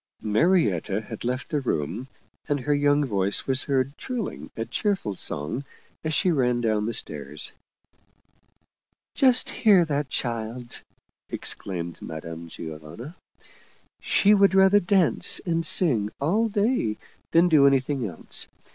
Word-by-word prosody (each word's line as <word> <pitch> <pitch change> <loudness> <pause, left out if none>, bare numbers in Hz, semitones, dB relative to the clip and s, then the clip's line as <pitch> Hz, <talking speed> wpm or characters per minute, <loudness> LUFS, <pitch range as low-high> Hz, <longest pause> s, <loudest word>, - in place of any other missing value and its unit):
Marietta 105 - +1
had 110 0 -9
left 125 +3 -3
the 150 -2 -1
room, 100 - -3 0.4
and 145 -2 0
her 145 +3 0
young 145 0 +2
voice 100 -4 0
was 130 0 +1
heard 135 0 0
trilling 245 -6 -5
a 115 - -2
cheerful 180 - -2
song 85 - -4 0.4
as 155 - -2
she 180 +4 +2
ran 125 -5 +1
down 110 -2 0
the - - -1
stairs. 75 -6 -5 0.8
" - - -43 0.3
Just 255 -2 +3
hear 200 -6 +4
that 145 -2 -2
child! 120 0 -4 0.2
" - - -52
exclaimed 85 -3 -5
Madame 80 +1 -8
Giovanna. 80 - -9 0.5
" - - -32
She 205 +1 +3
would 200 -2 +4
rather 190 +1 +6
dance 185 -3 +4
and 165 -2 0
sing 125 - +5
all 210 +11 +1
day 205 - 0 0.3
than 170 +2 +4
do 150 -5 +5
any 135 -1 +4
thing 130 -3 -3
else. 85 -5 -1
130 Hz, 140 wpm, -25 LUFS, 105-170 Hz, 0.8 s, rather